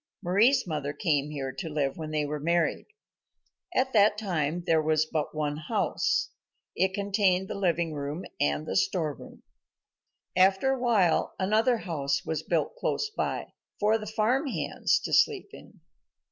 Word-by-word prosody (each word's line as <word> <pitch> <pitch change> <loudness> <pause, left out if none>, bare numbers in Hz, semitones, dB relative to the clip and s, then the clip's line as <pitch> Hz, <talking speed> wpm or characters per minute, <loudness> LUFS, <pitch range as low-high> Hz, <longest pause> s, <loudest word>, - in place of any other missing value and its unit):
Mari's 210 +10 +3
mother 150 -4 -3
came 145 -1 0
here 135 -3 -4
to 135 +5 -6
live 145 -3 -1
when 160 -2 -6
they 155 -1 -1
were 150 +1 -3
married. 170 +2 0 0.9
At 260 +1 +1
that 210 -1 +5
time 175 -5 -1
there 165 -3 +3
was 155 0 +2
but 155 -1 -3
one 150 -1 -1
house. 155 - 0 0.4
It 190 +2 +1
contained 200 -2 +1
the - - -4
living 170 -4 0
room 145 +4 -4
and 75 +1 0
the - - -4
storeroom. 145 - -2 0.9
After 190 +7 +4
a 265 - -1
while 215 -9 +2
another 220 +6 +2
house 140 -9 -2
was 160 -1 -2
built 165 - -1
close 440 -3 -1
by, - - -3 0.3
for 215 +2 +3
the 215 - -7
farm 230 +7 +1
hands - - 0
to - - -4
sleep 410 -3 +3
in. - - -14
170 Hz, 155 wpm, -28 LUFS, 150-210 Hz, 0.9 s, that